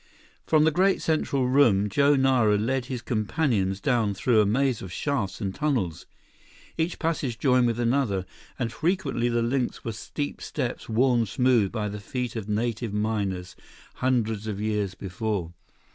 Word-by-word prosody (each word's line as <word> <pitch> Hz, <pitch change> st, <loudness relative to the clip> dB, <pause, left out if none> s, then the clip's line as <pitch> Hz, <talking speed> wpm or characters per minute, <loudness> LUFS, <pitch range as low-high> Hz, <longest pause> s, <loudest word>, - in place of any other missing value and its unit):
From 155 Hz, -1 st, +4 dB
the 160 Hz, -, +4 dB
great 190 Hz, +5 st, +3 dB
central 140 Hz, -5 st, 0 dB
room, 120 Hz, -7 st, +4 dB
Joe 140 Hz, +8 st, +3 dB
Nara 130 Hz, -6 st, +3 dB
led 125 Hz, +4 st, -1 dB
his 125 Hz, -2 st, -5 dB
companions 110 Hz, -4 st, 0 dB
down 110 Hz, -3 st, +1 dB
through 110 Hz, +2 st, +3 dB
a 105 Hz, -, +2 dB
maze 130 Hz, +2 st, +1 dB
of 95 Hz, -, -7 dB
shafts 120 Hz, -, -2 dB
and 95 Hz, -3 st, -3 dB
tunnels. 120 Hz, -, -1 dB, 0.7 s
Each 165 Hz, +2 st, -1 dB
passage 150 Hz, -8 st, -1 dB
joined 125 Hz, 0 st, +3 dB
with 115 Hz, 0 st, -1 dB
another, 120 Hz, -6 st, +1 dB, 0.3 s
and 115 Hz, -2 st, -2 dB
frequently 155 Hz, -4 st, 0 dB
the 120 Hz, -1 st, +1 dB
links 125 Hz, +1 st, -1 dB
were 115 Hz, -, -2 dB
steep 145 Hz, +7 st, -5 dB
steps -, -, -4 dB
worn 120 Hz, 0 st, +2 dB
smooth 120 Hz, -2 st, +2 dB
by 110 Hz, -3 st, -2 dB
the 105 Hz, 0 st, -5 dB
feet 125 Hz, +4 st, -4 dB
of 110 Hz, -2 st, -5 dB
native 110 Hz, 0 st, -1 dB
miners, 100 Hz, -4 st, -2 dB, 0.4 s
hundreds 115 Hz, -4 st, 0 dB
of 105 Hz, -2 st, -3 dB
years 105 Hz, -3 st, -1 dB
before. 95 Hz, -3 st, -3 dB
115 Hz, 160 wpm, -26 LUFS, 105-130 Hz, 0.7 s, From